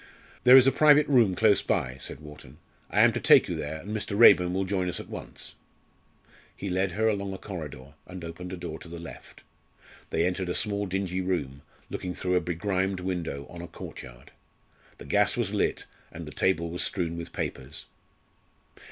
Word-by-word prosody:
"There 125 +1 +10
is 130 - +8
a 135 - +5
private 150 0 +5
room 120 -9 +4
close 105 +1 +4
by," 65 +1 -1
said 70 - -6
Wharton, 75 -2 -13 0.3
"I - - +3
am - - +6
to - - -2
take - - +6
you - - -3
there, 75 +1 -4
and 105 +3 -5
Mr. 100 -1 -3
Raeburn 90 -6 +7
will 95 +1 -1
join 95 -1 -1
us - - -3
at - - -9
once." - - -7 1.0
He 100 - -4
led 95 0 0
her 110 +3 +1
along 100 -2 -1
a - - -6
corridor, 75 -9 -8
and 90 -1 -9
opened 85 +2 -7
a 95 - -5
door 85 -2 -6
to - - -10
the 85 +1 -8
left. 85 0 -11 0.7
They - - +1
entered 90 0 -1
a 90 - -1
small 100 -1 0
dingy 95 0 -2
room, 70 -7 -2 0.3
looking 90 -1 -4
through 90 +1 -1
a 90 - +3
begrimed 95 +2 -1
window 85 -6 -3
on 85 - -9
a 85 - -7
courtyard. 65 -6 -11 0.7
The - - -11
gas 100 +11 +2
was 110 -4 -1
lit, 105 - 0 0.3
and - - -8
the - - -8
table 85 -3 0
was 90 - -2
strewn 85 -4 -1
with 85 0 -7
papers. 70 +5 -4
90 Hz, 195 wpm, -27 LUFS, 85-100 Hz, 1.0 s, There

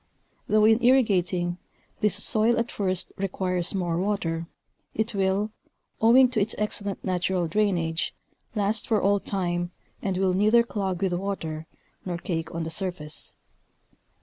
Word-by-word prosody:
Though 215 0 +4
in 225 +2 +4
irrigating, 185 -8 +3 0.4
this 205 -1 +2
soil 225 +2 +2
at 230 0 -1
first 185 -3 -1
requires 185 -1 -1
more 175 -3 0
water, 170 -4 -1 0.5
it 220 +1 -1
will, 195 +2 +1 0.5
owing 245 +4 +7
to 235 -4 0
its 210 +2 -1
excellent 205 -2 -3
natural 180 -1 0
drainage, 170 -4 0 0.4
last 210 +1 0
for 220 -2 +3
all 200 +1 +3
time 175 -3 -1 0.3
and 190 -2 -1
will 190 -1 +2
neither 215 +5 +5
clog 195 -5 -2
with 185 -2 +1
water 165 -4 -3 0.4
nor 175 -2 -3
cake 165 -2 -3
on 165 0 -3
the 165 - -4
surface. 165 -4 -2
190 Hz, 140 wpm, -26 LUFS, 175-210 Hz, 0.5 s, owing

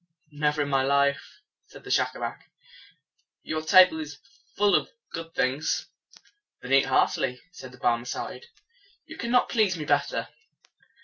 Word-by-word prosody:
"Never 150 0 0
in 145 - -5
my 135 -1 +2
life," 140 +1 0 0.3
said - - -14
Schacabac. - - -2 0.9
"Your 155 0 -3
table 180 0 +6
is 150 -2 -7 0.4
full 205 0 +3
of - - +2 0.2
good 165 0 -7
things." 135 +5 0 0.7
"Then 125 +2 -4
eat 135 0 +5
heartily," 125 -1 +1
said 130 -7 -11
the 125 - -15
Barmecide. 120 - -2 0.6
"You 320 - -10
cannot 245 -2 +1
please 210 -6 +2
me 155 - -5
better." 145 0 0
150 Hz, 130 wpm, -26 LUFS, 135-175 Hz, 0.9 s, table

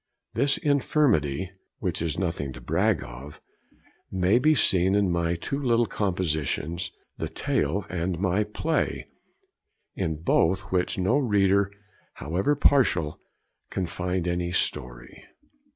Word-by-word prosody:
This 140 +4 +2
infirmity 125 - +1 0.3
(which - - -3
is 80 -2 -1
nothing 85 -7 -2
to 60 - -10
brag - - +1
of) 65 +5 -10 0.7
may 95 +5 +3
be 155 +4 +4
seen 95 -5 +3
in 100 -3 +2
my 85 0 0
two 140 +12 -4
little 120 -3 +3
compositions, 85 -4 -1 0.3
the - - -3
tale 85 +7 -1
and 90 0 -2
my 95 +3 +1
play, 155 +10 -1 0.9
in 80 -5 -2
both 80 +4 +2
which 90 -1 0
no 95 +10 +2
reader, 100 -5 +2 0.4
however 95 - 0
partial, 120 - +2 0.5
can 95 - -2
find 90 +1 -2
any 85 0 -1
story.' 60 -8 -2
90 Hz, 120 wpm, -26 LUFS, 85-105 Hz, 0.9 s, be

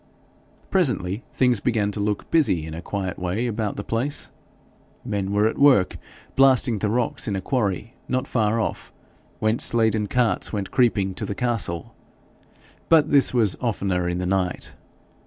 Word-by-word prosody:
Presently, 120 - 0
things 125 -4 +2
began 105 -3 0
to 105 - -5
look 105 0 -2
busy 140 - +2
in 80 - -7
a 80 - -6
quiet 95 0 -4
way 90 +6 -2
about 110 -3 -2
the 100 - -5
place. 125 +8 -2 0.7
Men 100 -1 -2
were 105 +1 +2
at 110 - -1
work 135 -10 +4 0.4
blasting 130 -4 +4
the 105 - 0
rocks 120 +2 -1
in 100 - -1
a - - -1
quarry 105 -1 -2
not 130 +1 -1
far 110 -1 +1
off, 110 - -3 0.5
whence 110 +2 +2
laden 110 -2 +2
carts 120 +1 +1
went 100 -3 -4
creeping 105 -6 +2
to - - -6
the 100 - -4
castle; 110 -8 -1 1.0
but 155 -2 +4
this 140 -2 +4
was 115 -6 +2
oftener 95 -7 -1
in 90 - -2
the 90 - -2
night. 90 -1 -1
105 Hz, 160 wpm, -23 LUFS, 95-125 Hz, 1.0 s, work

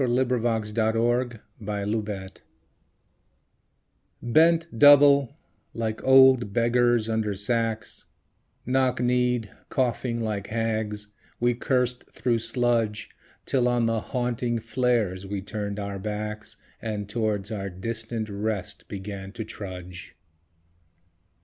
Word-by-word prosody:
Y - - +1
Z 120 - +1
Dulce 115 -3 0
Et - - -9
Decorum 120 +3 +1 0.4
Est 105 -2 -3 1.8
BENT 165 +7 +4
double, 140 0 +6 0.4
like 110 -1 -3
old 130 -4 +6
beggars 120 0 +2
under 110 -2 -1
sacks 115 +2 -2 0.6
Knock 130 0 +1
kneed, 125 -3 +1 0.2
coughing 120 -2 -1
like 105 -3 -3
hags, 110 -2 -2 0.3
we 120 0 +2
cursed 125 0 -1
through 120 -2 0
sludge, 115 -3 0 0.3
Till 125 -2 +2
on 120 -1 +2
the 115 -1 +1
haunting 120 0 -2
flares 115 -5 0
we 100 0 -3
turned 100 +1 -5
out 100 -1 -4
backs 105 +1 -5 0.2
And 105 -2 -4
towards 105 -1 -2
our 100 -2 -3
distant 110 +4 -4
rest 105 -1 -4
began 95 -1 -7
to 110 - -5
trudge. 90 -4 -8
115 Hz, 110 wpm, -26 LUFS, 105-120 Hz, 1.8 s, double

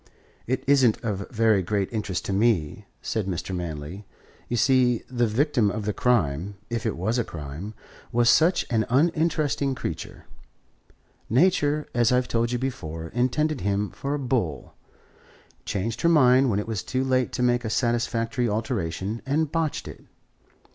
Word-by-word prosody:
"It 130 +2 -1
isn't 130 -5 +4
of 100 -3 -3
very 110 -3 +3
great 100 +1 -1
interest 100 -5 -3
to 100 - -2
me," 100 -7 +1 0.2
said 110 -4 -2
Mr. 95 0 -3
Manley. 85 +2 -5 0.5
"You 120 - 0
see, 125 -1 +3
the 120 -2 +1
victim 120 -1 +2
of 105 +1 -4
the 105 - 0
crime, 95 - 0 0.2
if 115 0 -1
it 105 - -2
was 110 +8 0
a - - +2
crime, 80 +5 -7 0.4
was 120 0 +2
such 160 +9 +4
an 110 -2 +2
uninteresting 150 -1 +1
creature. - - -6 1.0
Nature, 150 - +2
as 120 -1 +3
I've 125 0 +2
told 115 0 0
you 125 - 0
before, 80 -11 -5
intended 130 - 0
him 100 +1 -1
for 140 +1 -3
a - - -1
bull, 120 - -2 0.9
changed 110 +3 -3
her 170 - +4
mind 130 -4 +5
when 100 - +1
it 105 - -2
was 110 -5 -2
too 130 0 -2
late 130 -1 +1
to 125 - -1
make 120 0 +2
a 110 - -3
satisfactory 120 0 0
alteration, 105 -2 -2
and 150 +2 +1
botched 165 -3 -1
it. - - -10
115 Hz, 160 wpm, -25 LUFS, 100-130 Hz, 1.0 s, mind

